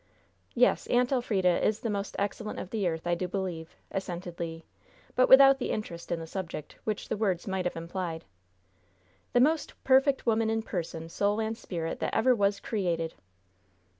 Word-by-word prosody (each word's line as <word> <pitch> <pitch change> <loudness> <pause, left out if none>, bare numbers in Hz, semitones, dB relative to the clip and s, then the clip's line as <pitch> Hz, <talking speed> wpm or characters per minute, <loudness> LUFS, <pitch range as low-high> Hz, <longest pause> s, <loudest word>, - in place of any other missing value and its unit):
"Yes, 250 +1 +3
Aunt 245 +1 +2
Elfrida 200 -9 +2
is 215 0 +1
the 230 - -2
most 200 0 -3
excellent 210 +2 -3
of 185 - -6
the 210 -5 0
earth, 160 -1 -3
I 175 - +1
do 180 +1 -1
believe," 180 -4 -4 0.2
assented 180 -2 -5
Le; 165 -1 -4 0.5
but 255 - +4
without 270 0 +8
the - - -2
interest 170 -6 -4
in 170 - 0
the 165 - -6
subject 165 -3 -6
which 215 -2 -2
the - - -1
words 190 -5 0
might 190 -1 -1
have 180 - -1
implied. 165 0 -4 1.1
"The 245 - +5
most 310 +4 +2
perfect 270 +1 +4
woman 225 -1 +2
in 225 0 0
person, 165 -5 -4
soul 205 +5 0
and 220 0 -1
spirit 170 -7 -4
that - - -2
ever 255 +3 +4
was 200 -3 +1
created!" 170 -6 -1
195 Hz, 175 wpm, -29 LUFS, 170-225 Hz, 1.1 s, without